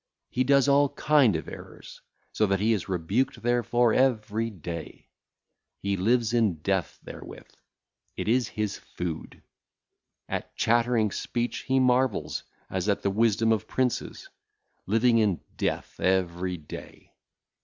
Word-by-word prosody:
He 130 - +1
doeth 140 +1 +4
all 140 0 +4
kind 145 - +3
of 80 - -4
errors, - - -11 0.3
so 110 - +1
that 95 -1 +1
he 110 +3 +3
is 100 -3 -3
rebuked 95 +10 -1
therefor 120 -1 +2
every 115 -3 +1
day. 85 -5 -8 0.7
He 100 0 -1
liveth 115 +4 +1
in 110 -7 +3
death 95 -9 -1
therewith; - - -10 0.7
it - - -3
is 120 +1 +2
his 105 -2 -3
food. 85 -3 -6 0.8
At - - -5
chattering 115 -2 +2
speech 120 +4 -2
he 130 0 +3
marvelleth, 125 -3 +1 0.3
as 95 +2 -2
at 100 - 0
the 100 - +1
wisdom 115 +1 +2
of 110 -3 0
princes, 130 -2 -2 0.6
living 115 +3 +4
in 100 -6 +2 0.2
death - - -3
every 90 -1 0
day. 75 -2 -11
110 Hz, 135 wpm, -27 LUFS, 95-120 Hz, 0.8 s, doeth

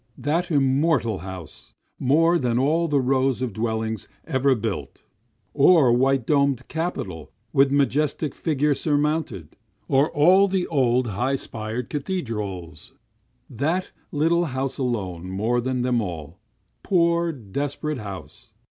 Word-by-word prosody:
That 165 +4 -1
immortal 135 - +2
house 95 -4 -9 0.2
more 165 +6 +3
than 120 -2 0
all 160 +6 +2
the 145 -3 +2
rows 130 0 +1
of 120 -5 -3
dwellings 110 0 -2 0.2
ever 130 0 +2
built! 100 - -5 0.5
Or 145 -3 +5
white 130 0 +2
domed 140 -3 +1
capitol 100 - -4 0.2
with 135 0 +5
majestic 145 +2 +1
figure 150 -2 +1
surmounted, 145 - -1 0.3
or 140 +2 +3
all 185 +7 +5
the 190 -2 0
old 130 -4 +2
high 125 +7 0
spired 115 -1 -5
cathedrals, 105 - -4 0.5
That 160 +10 -2 0.2
little 165 +4 +2
house 135 -2 -3
alone 95 -9 -3
more 110 +6 0
than 125 0 -1
them 125 -2 +1
all 85 -3 -6 0.4
poor, 170 -2 +2
desperate 140 +4 -4
house! 110 +3 -9
130 Hz, 120 wpm, -24 LUFS, 110-150 Hz, 0.5 s, Or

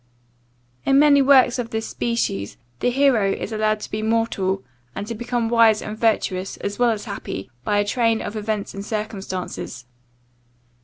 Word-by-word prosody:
In 275 - +3
many 285 -1 +6
works 260 -2 +5
of 235 -2 -3
this 220 0 -3
species, 230 - -2 0.2
the 245 - +2
hero 245 -6 +3
is - - -4
allowed 215 0 0
to - - -7
be 215 - -2
mortal, 215 -4 0 0.3
and 200 - -4
to 230 - -4
become 240 +1 -2
wise 225 -2 +5
and 210 - -6
virtuous 200 -4 0
as 200 +2 -5
well 245 -1 +4
as 220 -1 -2
happy, 130 - -6
by 205 - +1
a 205 - +2
train 230 +1 +1
of 205 - -5
events 215 -1 -3
and 195 - -6
circumstances. 195 - -5
220 Hz, 165 wpm, -22 LUFS, 200-235 Hz, 0.3 s, many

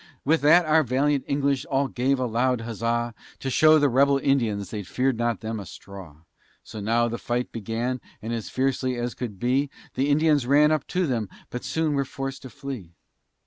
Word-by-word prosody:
With 160 +3 +3
that 165 +4 +6
our 155 +1 +4
valiant 140 +1 +1
English 140 -1 0
all 135 0 +1
gave 130 +1 0
a 130 - 0
loud 125 +1 +1
huzza, 115 +1 -2 0.2
To 135 - -4
show 155 +3 +6
the 145 -1 +4
rebel 140 +2 +4
Indians 115 -9 0
they 105 - -3
fear'd 125 +5 -1
them 120 -2 0 0.2
not - - -5
a - - -9
straw: 90 -6 -11 0.4
So 110 - -9
now 115 +3 +2
the 115 0 -4
fight 120 +1 -2
began, 115 +3 -3 0.2
and 110 +3 -4
as 115 -4 -4
fiercely 130 -1 0
as 120 0 -3
could 115 -6 -6
be, 130 +5 +1 0.2
The 135 +2 0
Indians 145 -3 +3
ran 150 +3 +5
up 155 - 0
to 185 0 0
them, 115 - -1 0.2
but 125 - -5
soon 160 -2 0
were 140 -1 +1
forced 135 0 -6
to 130 - -9
flee. 130 - -8
130 Hz, 195 wpm, -25 LUFS, 115-140 Hz, 0.4 s, that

